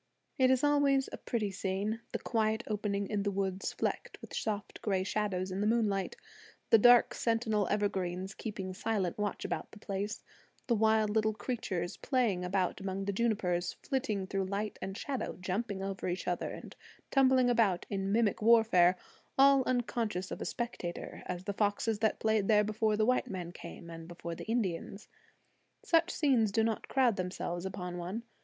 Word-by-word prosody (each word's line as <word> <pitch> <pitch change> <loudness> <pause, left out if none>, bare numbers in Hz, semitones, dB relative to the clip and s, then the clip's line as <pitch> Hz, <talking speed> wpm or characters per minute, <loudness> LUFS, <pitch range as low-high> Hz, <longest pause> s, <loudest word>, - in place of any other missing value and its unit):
It 260 -1 +5
is 260 0 +3
always 285 -2 +3
a - - -6
pretty 215 -4 -2
scene, 200 +4 -2
the - - -1
quiet 220 -1 0
opening 205 -2 -1
in 210 -2 -1
the 200 - 0
woods 195 -1 -2
flecked - - -3
with - - -11
soft 210 -1 -3
gray 190 -3 0
shadows 190 -2 -1
in 190 +2 -2
the 210 - +2
moonlight, 215 -4 +1 0.6
the 225 - +8
dark 245 +2 +7
sentinel 225 -3 +1
evergreens 190 -2 -1
keeping 195 -4 -5
silent 195 -2 -1
watch 205 -2 -2
about - - -3
the - - -13
place, 205 +1 -4 0.4
the 240 - +2
wild 220 -1 +3
little 220 0 +1
creatures 200 -6 -3
playing 230 -9 +1
about 185 +1 0
among 195 0 -3
the 200 - -1
junipers, 190 -6 0
flitting 215 -8 -1
through 195 0 -1
light 200 +2 -3
and 195 +1 -4
shadow, 270 +1 -3
jumping 195 +2 -2
over 195 -1 -3
each 180 +1 -3
other 175 -1 -1
and - - -9 0.4
tumbling 260 -2 +5
about 220 -7 +2
in 195 -1 -2
mimic 220 -1 +2
warfare, 215 -6 +5 0.4
all 275 0 +7
unconscious 230 -6 -1
of - - -5
a - - -2
spectator 235 -8 -4
as 180 0 -4
the 200 - -3
foxes 205 +1 0
that 220 0 +2
played 220 -2 +2
there 210 -1 +5
before 215 0 0
the 215 - +3
white 255 +2 +2
man 180 -3 -5
came, 175 - -10
and 165 0 -9
before 170 -1 -6
the - - -7
Indians. 210 -2 -2 0.8
Such 335 0 +3
scenes 255 - +2
do 225 +2 +2
not 225 -1 -1
crowd 255 -6 +3
themselves 180 -1 -3
upon 180 -2 -5
one. 190 +7 -4
210 Hz, 175 wpm, -32 LUFS, 190-225 Hz, 0.8 s, the